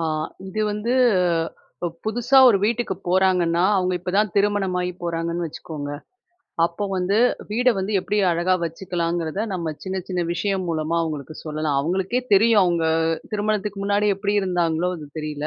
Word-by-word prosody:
அ -, -, -2 dB, 0.5 s
இது 215 Hz, +3 st, -3 dB
வந்து, 210 Hz, +3 st, -2 dB, 0.9 s
ப -, -, +1 dB, 0.2 s
புதுசா 240 Hz, +5 st, +3 dB
ஒரு 210 Hz, -5 st, +4 dB
வீட்டுக்கு 235 Hz, -3 st, -1 dB
போறாங்கன்னா, 180 Hz, -2 st, +3 dB
அவங்க 185 Hz, -1 st, +1 dB
இப்ப 180 Hz, -, -4 dB
தான் 210 Hz, -3 st, +1 dB
திருமணமாயி 195 Hz, -3 st, +1 dB
போறாங்கன்னு 170 Hz, 0 st, -2 dB
வச்சுக்கோங்க, 145 Hz, -1 st, -7 dB, 0.7 s
அப்போ 170 Hz, +4 st, -2 dB
வந்து, 185 Hz, +2 st, +1 dB, 0.3 s
வீட 245 Hz, +4 st, +2 dB
வந்து 190 Hz, +3 st, -2 dB
எப்படி 205 Hz, +3 st, -2 dB, 0.2 s
அழகா 175 Hz, +2 st, +1 dB
வச்சுக்கலாங்கிறத, 170 Hz, 0 st, -2 dB
நம்ம 170 Hz, -3 st, -3 dB, 0.2 s
சின்ன, 190 Hz, 0 st, -3 dB
சின்ன 180 Hz, -2 st, -1 dB
விஷயம் 190 Hz, +1 st, -1 dB
மூலமா 160 Hz, +1 st, -1 dB
அவங்களுக்கு 155 Hz, -1 st, -5 dB
சொல்லலாம். 155 Hz, -2 st, -1 dB
அவங்களுக்கே 190 Hz, -, 0 dB
தெரியும், 220 Hz, +2 st, +5 dB
அவங்க 170 Hz, -2 st, +1 dB, 0.5 s
திருமணத்துக்கு 210 Hz, -1 st, -1 dB
முன்னாடி 205 Hz, +1 st, +2 dB
எப்படி 200 Hz, +1 st, -1 dB
இருந்தாங்களோ, 175 Hz, -2 st, 0 dB
அது 155 Hz, -3 st, -9 dB
தெரியல. 150 Hz, -1 st, -4 dB
180 Hz, 145 wpm, -22 LUFS, 165-205 Hz, 0.9 s, தெரியும்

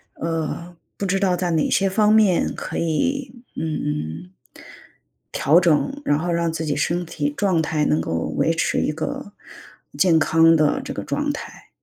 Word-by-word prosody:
呃， 165 Hz, +1 st, -4 dB, 0.2 s
不 200 Hz, -, -3 dB
知 195 Hz, 0 st, 0 dB
道 190 Hz, -2 st, +2 dB
在 175 Hz, -1 st, -1 dB
哪 160 Hz, -2 st, +1 dB
些 195 Hz, +3 st, +2 dB
方 210 Hz, +2 st, +3 dB
面 210 Hz, -5 st, +3 dB
可 -, -, -5 dB
以， 245 Hz, -, -2 dB
嗯， 90 Hz, -, -4 dB, 1.0 s
调 155 Hz, +5 st, +4 dB
整， 180 Hz, -, +1 dB
然 145 Hz, -, +2 dB
后 175 Hz, +2 st, -2 dB
让 170 Hz, -1 st, 0 dB
自 160 Hz, 0 st, -4 dB
己 145 Hz, -, -1 dB
身 175 Hz, +4 st, -1 dB
体 145 Hz, -3 st, -3 dB
状 185 Hz, -5 st, +1 dB
态， 155 Hz, -1 st, 0 dB
能 75 Hz, -, +2 dB
够 80 Hz, 0 st, -2 dB
维 165 Hz, -, +2 dB
持 165 Hz, -, 0 dB
一 -, -, 0 dB
个 160 Hz, +6 st, -5 dB, 0.6 s
健 175 Hz, -4 st, +4 dB
康 165 Hz, +1 st, +5 dB
的 155 Hz, -2 st, +2 dB
这 -, -, -6 dB
个 -, -, -5 dB
状 -, -, -1 dB
态。 -, -, -9 dB
165 Hz, 185 characters per minute, -22 LUFS, 150-190 Hz, 1.0 s, 康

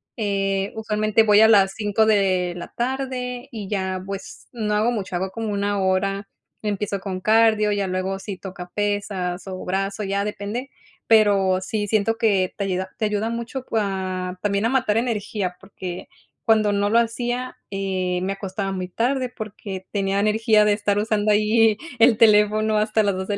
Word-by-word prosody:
eh, 195 Hz, -2 st, -1 dB
usualmente 215 Hz, 0 st, +1 dB
voy 210 Hz, -1 st, +5 dB
a 220 Hz, -, +8 dB
las 195 Hz, -3 st, +5 dB
5 215 Hz, 0 st, +1 dB
de 185 Hz, -4 st, +2 dB
la 175 Hz, -, -8 dB
tarde, 250 Hz, 0 st, -3 dB
y 210 Hz, -4 st, -6 dB
ya 190 Hz, -2 st, -2 dB
pues, 195 Hz, 0 st, -8 dB
no 215 Hz, -3 st, -2 dB
hago 215 Hz, +3 st, +2 dB
mucho. 200 Hz, -6 st, -4 dB
Hago 190 Hz, +2 st, -1 dB
como 225 Hz, -1 st, -4 dB
1 200 Hz, 0 st, 0 dB
hora, 195 Hz, +1 st, 0 dB, 0.4 s
empiezo 205 Hz, -1 st, -2 dB
con 190 Hz, -1 st, -5 dB
cardio, 220 Hz, 0 st, +4 dB
ya 200 Hz, -2 st, 0 dB
luego 185 Hz, +1 st, -2 dB
si 195 Hz, -1 st, -7 dB
toca 185 Hz, -2 st, -8 dB
pesas, 200 Hz, -3 st, -2 dB
o 185 Hz, -1 st, -6 dB
brazo, 195 Hz, +3 st, -2 dB
ya 200 Hz, +1 st, -1 dB
depende, 210 Hz, +5 st, -4 dB, 0.4 s
pero, 200 Hz, -4 st, +4 dB
sí 205 Hz, +2 st, -2 dB
siento 220 Hz, +2 st, +1 dB
que 200 Hz, -5 st, +2 dB
te 200 Hz, -, -1 dB
ayuda 185 Hz, 0 st, -2 dB
te 220 Hz, -, 0 dB
ayuda 210 Hz, +1 st, -1 dB
mucho 235 Hz, +3 st, -4 dB
cua 185 Hz, -3 st, -2 dB
también 200 Hz, +1 st, +1 dB
a -, -, +3 dB
matar 235 Hz, -5 st, +1 dB
energía, 210 Hz, -5 st, -2 dB
porque, 185 Hz, -2 st, -7 dB, 0.4 s
cuando 215 Hz, -2 st, +4 dB
no 205 Hz, 0 st, +1 dB
lo 225 Hz, -, +3 dB
hacía, 240 Hz, +2 st, -2 dB
eh, 185 Hz, -2 st, -1 dB
me 195 Hz, -, -1 dB
acostaba 195 Hz, 0 st, -4 dB
muy 185 Hz, -1 st, -3 dB
tarde, 250 Hz, +6 st, 0 dB
porque, 200 Hz, -3 st, -7 dB
tenía 195 Hz, -1 st, 0 dB
energía 215 Hz, +1 st, +3 dB
de 210 Hz, -, +4 dB
estar 205 Hz, -1 st, 0 dB
usando 210 Hz, 0 st, +1 dB
ahí 215 Hz, +1 st, +4 dB, 0.2 s
el 230 Hz, -1 st, +6 dB
teléfono, 215 Hz, 0 st, +4 dB
hasta 215 Hz, 0 st, +2 dB
las 200 Hz, -2 st, +1 dB
2 190 Hz, 0 st, -4 dB
de 205 Hz, -1 st, -1 dB
205 Hz, 175 wpm, -23 LUFS, 195-220 Hz, 0.4 s, a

